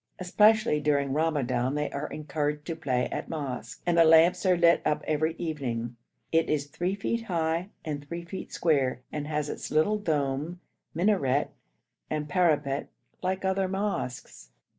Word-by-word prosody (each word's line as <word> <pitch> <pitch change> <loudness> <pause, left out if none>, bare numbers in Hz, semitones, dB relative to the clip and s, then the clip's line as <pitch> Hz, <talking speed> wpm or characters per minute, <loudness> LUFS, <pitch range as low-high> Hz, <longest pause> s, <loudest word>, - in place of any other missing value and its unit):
Especially 210 -1 +4
during 140 -2 +1
Ramadan 140 -4 0
they 150 0 -1
are 140 +2 -3
encouraged 150 -1 -3
to 165 - -3
play 130 -6 0
at - - -4
mosque, 125 -6 -5
and 175 -1 +3
the - - +9
lamps 165 +4 +5
are 180 -1 +4
lit 170 0 +5
up 150 - 0
every 155 +1 0
evening. 125 -8 -3 0.4
It 165 0 +2
is 145 -2 +1
3 175 +6 -2
feet 230 +3 -2
high 170 -1 -1 0.2
and 145 -2 -4
3 170 +2 -6
feet 190 +3 -7
square, 135 -6 +1
and 150 -1 -4
has 150 -1 -1
its - - -5
little 160 +8 +2
dome, 150 -1 -1 0.4
minaret, 160 -7 +2 0.6
and 150 -1 -2
parapet 150 -5 +1 0.3
like 190 +1 -1
other 190 0 +1
mosques. 185 - -4
155 Hz, 155 wpm, -28 LUFS, 145-175 Hz, 0.6 s, the